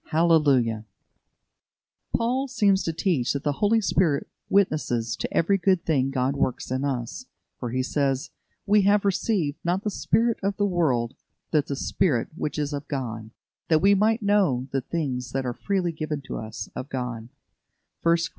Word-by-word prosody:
Hallelujah! 145 -9 +3 1.3
Paul 255 +4 +1
seems 205 -6 +2
to 165 - 0
teach 160 -6 0
that 140 - -3
the 145 - +1
Holy 225 +2 +4
Spirit 170 -7 +1 0.2
witnesses 150 - +1
to - - -4
every 195 +4 +2
good 185 -1 +2
thing 135 -5 +2
God 135 0 0
works 130 -2 -1
in 130 +1 -1
us, 135 - -3 0.3
for 120 - -3
he 130 +2 -1
says: 135 +1 -1 0.3
"We 210 +1 +4
have 200 +1 +3
received, 180 -6 0
not 180 +4 0
the 210 - -1
spirit 230 +4 +1
of 195 0 -1
the 205 - +2
world, 135 -11 +1 0.4
but 150 -2 +2
the 140 - -2
Spirit 140 -3 0
which 150 -3 -3
is 145 0 -1
of 145 +1 -5
God; 115 -6 -4 0.4
that 160 - +4
we 200 +2 +6
might 220 +3 +2
know 190 -12 +2
the 135 - 0
things 130 -5 -3
that 135 0 -1
are 125 - -1
freely 185 +3 -1
given 155 -2 -4
to - - -5
us 110 0 -6
of 130 - -6
God" 125 -3 -4 0.7
(1 170 0 +4
Cor. 165 - -2
155 Hz, 175 wpm, -25 LUFS, 130-195 Hz, 1.3 s, we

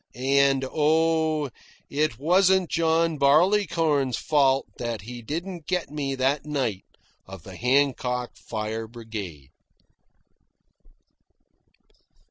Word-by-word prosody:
And, 135 +1 +2
oh, 155 -1 +1 0.4
it 145 -5 -1
wasn't 185 +5 +3
John 165 -1 +1
Barleycorn's 155 - +2
fault 140 -3 +2
that 120 -3 -3
he 120 +4 -9
didn't 170 - -6
get 180 -4 -2
me 140 -2 -3
that 135 +2 0
night 135 -10 -2 0.4
of 95 -3 -10
the 95 - -11
Hancock 125 +1 0
Fire 110 0 -5
Brigade. 105 - -8
140 Hz, 95 wpm, -25 LUFS, 120-160 Hz, 0.4 s, wasn't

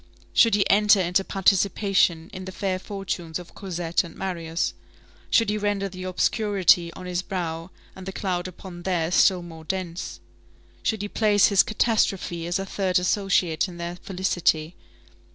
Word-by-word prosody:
Should 230 -3 +5
he 200 - +2
enter 205 0 +5
into 180 +1 +1
participation 195 -3 +2
in 185 0 -7
the 190 - -6
fair 185 0 -2
fortunes 185 -4 -4
of 175 -1 -11
Cosette 175 -3 -1
and 170 - -11
Marius? 170 -3 -2 0.6
Should 225 -3 +3
he 210 - -1
render 205 -1 0
the 185 -1 -8
obscurity 185 -2 +2
on 185 - -9
his 180 0 -2
brow 170 -3 -4 0.3
and 190 0 -10
the - - -3
cloud 185 -2 -2
upon 180 -1 -10
theirs 175 -2 -1
still 185 -1 +4
more 165 -2 -10
dense? 180 0 -4 0.6
Should 220 -2 -1
he - - -2
place 205 -1 +3
his 200 -3 +6
catastrophe 195 -6 0
as 175 - 0
a 195 - -3
third 190 -1 0
associate 180 -2 +1
in 175 -2 -10
their 170 0 -5
felicity? 180 -4 0
185 Hz, 160 wpm, -25 LUFS, 175-195 Hz, 0.6 s, his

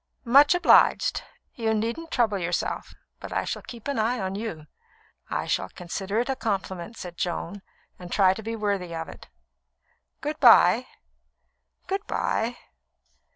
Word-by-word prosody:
"Much 280 +8 +6
obliged. 355 - +4 0.3
You 220 -2 0
needn't 235 +10 -3
trouble 220 -8 +1
yourself. 175 0 -3 0.2
But - - -9
I - - 0
shall - - -4
keep 235 -1 -10
my 245 -3 0
eye - - -5
on 190 -1 -3
you." 195 -7 -5 0.6
"I - - -2
shall - - -1
consider 195 +4 -4
it 245 - 0
a 270 - -1
compliment," 195 -2 -4
said 175 -1 -8
Joan, 175 +2 -3 0.4
"and 175 -1 -10
try 190 -2 +4
to 220 - -8
be 225 +1 -4
worthy 200 -5 -2
of 165 0 -4
it." - - -12 0.9
"Good 300 +1 -4
bye." 235 -1 +6 1.0
"Good 390 +1 -3
bye." 235 +2 -1
215 Hz, 150 wpm, -26 LUFS, 185-240 Hz, 1.0 s, Much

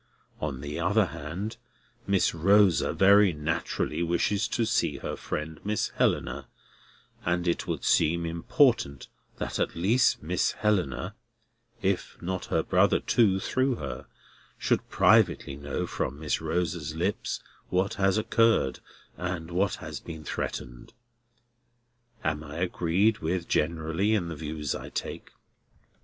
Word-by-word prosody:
On 70 -3 -3
the 75 +3 -5
other 100 +5 +3
hand, 90 +8 -5 0.5
Miss 100 -1 +2
Rosa 100 +2 +4
very 100 -1 +5
naturally 80 +2 -2
wishes 85 +4 +1
to 115 - 0
see 80 -8 +1
her - - -4
friend 75 0 -5
Miss 105 0 0
Helena, - - 0 0.8
and 85 +1 0
it 85 - 0
would - - -3
seem 85 +1 +3
important 80 -4 +1 0.3
that - - -3
at - - 0
least 110 +9 +2
Miss 90 +3 +1
Helena 95 -3 0 0.7
(if 95 -1 -1
not 90 +1 -3
her - - 0
brother - - +3
too, 100 -5 +3
through 130 +5 +1
her) - - -6 0.5
should - - 0
privately 70 - +3
know 70 0 -3
from 70 +3 -3
Miss 75 0 -1
Rosa's 80 -1 -2
lips 90 +5 -1 0.3
what 95 +2 +1
has 95 +1 +2
occurred, 110 - +2 0.4
and 90 -2 -4
what 90 +2 +1
has - - -7
been 80 -2 -9
threatened. 60 - -5 1.3
Am 75 - -1
I 75 +1 -8
agreed 90 +4 +1
with 85 +2 -2
generally 80 +6 +1
in 85 -5 -1
the 85 - -5
views 75 -1 -3
I - - -6
take?" - - -5
85 Hz, 130 wpm, -28 LUFS, 80-100 Hz, 1.3 s, very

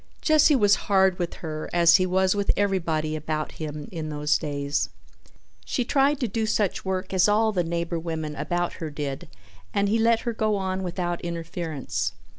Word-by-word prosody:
Jesse 310 -1 +5
was 205 -5 +5
hard 190 -2 +4
with 175 -1 -2
her 155 -1 -4
as 170 0 +6
he 185 -1 +1
was 185 +1 +2
with 200 -1 -2
everybody 165 -6 0
about 155 0 -3
him 150 -2 -6
in 160 -3 -4
those 150 0 +1
days. 145 -1 -2 0.7
She 250 - -1
tried 280 +2 +2
to 245 - +1
do 220 +1 -1
such 215 -3 0
work 190 0 -3
as 185 0 +4
all 220 +1 +3
the 180 -4 0
neighbor 170 0 -2
women 160 -2 -4
about 175 +5 -1
her 160 - -3
did 145 -2 -5 0.5
and 200 0 +2
he 220 +3 +2
let 230 0 +3
her 235 - -2
go 215 -1 +1
on 190 -1 -2
without 175 -1 -3
interference. 165 -3 -3
175 Hz, 180 wpm, -25 LUFS, 155-205 Hz, 0.7 s, as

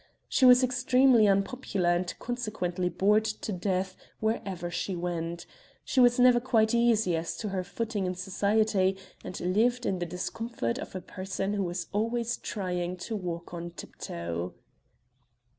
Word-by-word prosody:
She 260 - +3
was 250 0 +8
extremely 255 -2 +4
unpopular 195 -2 +1
and 175 +1 +1
consequently 195 -7 -2
bored 210 +4 +3
to 215 0 -4
death 185 0 -1 0.2
wherever 195 -6 -2
she 185 +2 -2
went; 170 -1 -3 0.4
she 265 - 0
was 245 -1 +6
never 250 -1 +6
quite 225 -2 +2
easy 225 -6 +3
as 165 0 -3
to 215 - -3
her 190 -1 -2
footing 205 +1 -3
in 180 - -2
society 195 +1 +1 0.3
and 185 - -6
lived 235 +7 +1
in 185 - 0
the 175 - -2
discomfort 180 - -3
of - - -8
a 185 - -3
person 195 +1 -4
who 195 -3 -1
is 175 0 -3
always 230 +3 -1
trying 180 -2 -3
to 220 +5 -5
walk 175 -3 -5
on 170 0 -5
tiptoe. 85 +1 -5
195 Hz, 150 wpm, -29 LUFS, 180-230 Hz, 0.4 s, was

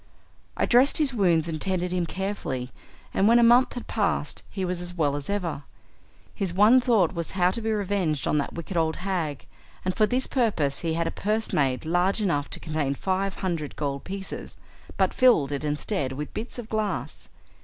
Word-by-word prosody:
I - - +2
dressed 255 +4 +5
his 290 -4 +2
wounds 175 -7 +2
and 155 -2 -4
tended 180 -2 -1
him 180 -2 0
carefully, 165 -10 -4 0.4
and 195 - +3
when 230 +2 +6
a 240 - +5
month 240 +2 +5
had 245 - -6
passed 200 -8 -1
he 190 -2 -3
was 180 -1 -3
as 175 0 -6
well 145 -4 +1
as 145 +3 -5
ever. 180 -8 -2 0.7
His 190 -4 -3
one 220 +6 +6
thought 220 -9 +3
was 170 -2 -3
how 180 0 +4
to 230 - -3
be 225 0 -1
revenged 195 -8 0
on 150 - +2
that 140 - -3
wicked 170 +3 -6
old 160 -1 +1
hag, 165 -7 -2 0.4
and 185 - 0
for 215 - +3
this 250 +4 +1
purpose 200 - 0
he 165 -1 -1
had 170 0 0
a - - -1
purse 215 +2 -1
made 130 -3 +1
large 175 +5 +2
enough 160 -9 0
to - - -6
contain 155 -3 -2
five 190 +4 -1
hundred 165 -5 -3
gold 140 -2 -3
pieces, 195 0 -6 0.4
but - - +2
filled 235 - +4
it 140 +1 -3
instead 150 -1 -1
with 150 +2 -6
bits 225 +4 -5
of 240 -3 -6
glass. 200 - -3
180 Hz, 195 wpm, -26 LUFS, 155-210 Hz, 0.7 s, when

